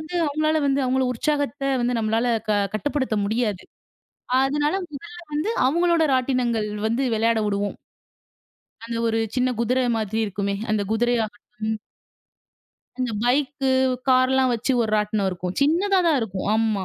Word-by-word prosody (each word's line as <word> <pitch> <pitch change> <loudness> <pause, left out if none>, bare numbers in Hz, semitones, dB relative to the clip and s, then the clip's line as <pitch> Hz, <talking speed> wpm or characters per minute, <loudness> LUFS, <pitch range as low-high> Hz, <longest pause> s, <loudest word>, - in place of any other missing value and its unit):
வந்து 310 +3 -8
அவுங்களால 310 +1 +1
வந்து, 275 0 +2
அவுங்கள 260 +1 +1
உற்சாகத்த 285 +1 -1 0.2
வந்து 240 0 0
நம்மளால 225 +2 +1 0.2
க - - +2 0.2
கட்டுப்படுத்த 260 -2 -1
முடியாது. 215 -3 -1 0.8
அதனால 295 +4 +1 0.2
முதல்ல 340 +5 -9
வந்து 305 +8 -1 0.2
அவுங்களோட 340 +3 +2
ராட்டினங்கள் 245 -4 0 0.2
வந்து 230 +5 0
விளையாட 225 +1 +2
உடுவோம். 200 0 -2 1.1
அந்த 230 0 -4
ஒரு 225 0 +1 0.2
சின்ன 255 0 +2
குதிர 250 +3 +1 0.2
மாரி 220 0 -2
இருக்குமே! 200 0 -2 0.2
அந்த 210 -1 +1
குதிரையாகட்டும், 220 -2 -1 1.2
அந்தப் 230 -5 -2
பைக்கு, 270 +2 +1 0.4
கார்லாம் 260 0 +4
வச்சு 235 +4 -1
ஒரு 220 - -1
ராட்டினம் 210 -1 0
இருக்கும். 180 0 -5
சின்னதா 370 +6 +3
தான் 305 -4 +3
இருக்கும். 195 -4 -4
ஆமா. 220 -3 +1
245 Hz, 130 wpm, -23 LUFS, 215-280 Hz, 1.2 s, கார்லாம்